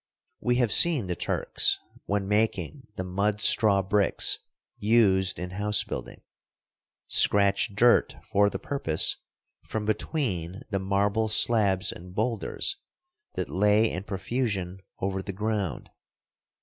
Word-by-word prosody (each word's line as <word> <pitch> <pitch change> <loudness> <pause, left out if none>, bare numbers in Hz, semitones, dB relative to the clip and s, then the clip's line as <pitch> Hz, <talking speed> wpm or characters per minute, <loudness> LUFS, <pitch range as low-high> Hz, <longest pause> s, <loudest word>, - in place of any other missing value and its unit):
We 125 0 0
have 120 -4 +1
seen 160 - +7
the 90 -1 -3
Turks, - - -1 0.3
when 100 -1 -1
making 105 - -2
the 95 - -4
mud 100 +3 -1
straw 100 -2 +4
bricks 100 +1 +1 0.4
used 100 -4 +2
in 90 +2 -6
house 105 +2 +2
building, - - -8 0.8
scratch 100 +1 +2
dirt 120 +3 +3
for 100 +1 +2
the 95 - -5
purpose 95 - -1 0.5
from 110 -1 -5
between 105 - -3
the 100 - -1
marble 100 +3 0
slabs 105 -3 +3
and 90 +1 -12
boulders 115 - -2 0.6
that - - -3
lay 105 +3 +2
in 90 - -5
profusion 100 -3 -3 0.2
over 95 0 -2
the 100 +1 -7
ground. 105 -1 -3
100 Hz, 125 wpm, -26 LUFS, 95-110 Hz, 0.8 s, seen